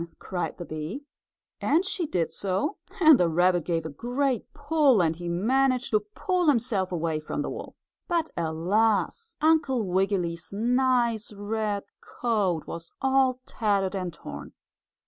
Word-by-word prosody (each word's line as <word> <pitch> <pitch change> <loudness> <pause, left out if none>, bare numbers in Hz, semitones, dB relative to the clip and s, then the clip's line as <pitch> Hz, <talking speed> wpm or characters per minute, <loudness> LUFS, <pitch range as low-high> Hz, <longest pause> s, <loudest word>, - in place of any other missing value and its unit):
cried 180 -2 -4
the 175 - -6
bee, 160 - -6 0.5
and 325 +7 +2
she 375 -4 -2
did 175 - -1
so, 200 - -1 0.3
and 315 -5 +8
the 175 - +3
rabbit 175 +1 +3
gave 165 -1 -1
a - - -3
great 245 - -2
pull, 290 -5 +3
and 165 -2 +2
he 175 0 -5
managed 255 +8 +1
to 215 - +4
pull 345 - -1
himself 230 -9 +2
away 165 -2 -1
from 155 - -3
the - - -4
wolf. - - -7 0.3
But, 335 -3 0
alas! 200 - 0
Uncle 305 -6 +3
Wiggily's 180 -3 -1
nice 235 0 +1
red 205 0 -2 0.2
coat 200 -9 -1
was 170 0 -8
all 265 -1 +3
tattered 200 -4 0
and 185 -2 -3
torn. 75 - -9
210 Hz, 145 wpm, -27 LUFS, 175-265 Hz, 0.5 s, and